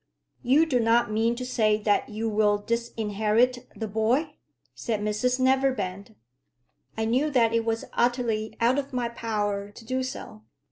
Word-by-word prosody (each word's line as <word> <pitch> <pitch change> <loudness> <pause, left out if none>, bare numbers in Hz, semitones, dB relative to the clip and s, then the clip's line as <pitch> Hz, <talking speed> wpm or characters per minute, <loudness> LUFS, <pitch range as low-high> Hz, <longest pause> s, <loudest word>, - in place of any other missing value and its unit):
"You 275 +6 +4
do 265 -6 +1
not 230 -1 +3
mean 225 +2 +1
to 250 +1 -5
say 215 -4 +2
that 210 -1 +1
you 220 +1 -3
will 210 -1 +2
disinherit 230 +2 0
the 220 - -4
boy?" 235 +9 0 0.4
said 210 - -3
Mrs 215 +5 0
Neverbend. 245 -7 0 0.8
I 220 - 0
knew 255 +7 +1
that 235 -5 +2
it 230 -1 +1
was 225 0 -1
utterly 230 -3 0
out 245 +4 +3
of 280 -1 -6
my 245 -2 -1
power 205 -3 -2
to 225 +2 -14
do 255 +3 -1
so. 255 - -7
230 Hz, 155 wpm, -26 LUFS, 215-250 Hz, 0.8 s, You